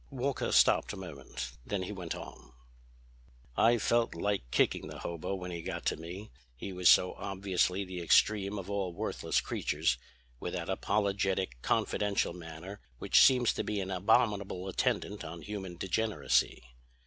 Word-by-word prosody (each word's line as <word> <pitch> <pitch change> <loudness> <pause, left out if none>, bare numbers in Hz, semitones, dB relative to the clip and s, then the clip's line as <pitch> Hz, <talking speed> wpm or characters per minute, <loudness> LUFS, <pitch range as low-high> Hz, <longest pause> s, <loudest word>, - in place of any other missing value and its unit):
Walker 135 0 -2
stopped - - +4
a - - -7
moment. 70 -7 -7
Then 95 +7 -2
he 90 - -5
went 90 -5 -5
on: - - -11 1.0
"I 120 +1 +5
felt 115 -2 +1
like 100 -7 -1
kicking - - +1
the - - -8
hobo 85 +3 -4
when 90 -1 -6
he 85 -1 -5
got - - -5
to - - +1
me, 85 +5 -8 0.2
he 95 +10 -6
was 90 -1 +4
so 90 - +6
obviously 95 0 0
the 90 -1 -6
extreme 100 +3 +3
of 95 -2 -6
all 100 -3 -2
worthless - - -1
creatures, 65 0 0 0.4
with 90 - -4
that 90 0 -3
apologetic, 95 - 0
confidential 100 -4 0
manner 85 +3 -9 0.2
which - - +4
seems 125 -3 +5
to - - -2
be 105 -1 -2
an 95 0 -3
abominable 100 -1 +1
attendant 100 +2 -1
on 80 0 -8
human 95 -1 -6
degeneracy. 105 - +1
95 Hz, 155 wpm, -31 LUFS, 85-100 Hz, 1.0 s, so